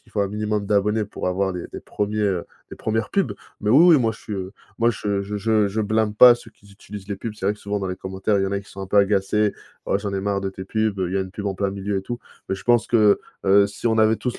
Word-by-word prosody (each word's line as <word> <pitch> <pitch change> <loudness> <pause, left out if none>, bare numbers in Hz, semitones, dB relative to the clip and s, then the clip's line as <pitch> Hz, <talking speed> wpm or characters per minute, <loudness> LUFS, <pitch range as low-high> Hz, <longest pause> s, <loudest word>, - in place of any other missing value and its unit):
qu'il - - -25
faut 105 - 0
un 100 - +1
minimum 105 0 -2
d'abonnés 105 +1 +1
pour 100 - -4
avoir 95 +1 0
des 90 -1 -5
des - - -6
1er, 105 +1 -3
heu, 95 -4 0 0.3
les - - -9
1re 110 -1 -2
pubs. 170 - +1 0.3
Mais 105 - 0
oui, 165 +6 +7
oui - - +6
moi 115 -2 +2
je - - -13
suis, 105 - -8
heu, 95 -1 -4 0.3
moi 115 +1 +4
je 100 -2 -2
je 105 +1 -5
je 105 0 +2
je 110 +3 -2
blâme 110 0 0
pas 120 +2 +9
ceux 115 - -13
qui 100 -1 -23
utilisent 100 0 -11
les 100 - -3
pubs. 110 +1 -6
C'est 100 -2 -4
vrai 100 - +3
que - - -20
souvent 100 0 -2
dans 95 - -3
les 90 - -4
commentaires 95 +2 -1
il 95 - +1
y - - +1
en 95 - -3
a 100 - -1
qui 100 - -18
sont 95 - -10
un 95 - -5
peu 105 - 0
agacés: 100 +1 +2 0.3
«Oh - - +2
j'en 100 -1 -4
ai 95 - -1
marre 100 0 -1
de 95 0 -3
tes 95 0 -8
pubs, 110 0 -1
heu, 90 -2 -1
il 95 - -4
y - - +1
a - - +1
une 95 -1 -5
pub 100 +1 -6
en 95 - -1
plein 100 +1 -1
milieu 100 0 -2
et - - -5
tout». 120 +4 -5 0.3
Mais 95 - 0
je - - -12
pense 120 -2 +3
que, 105 -3 +4 0.3
heu, 100 +1 +6
si 100 +4 -5
on 110 -1 +2
avait 110 0 +4
tous 125 -1 -4
100 Hz, 315 wpm, -22 LUFS, 95-110 Hz, 0.3 s, pas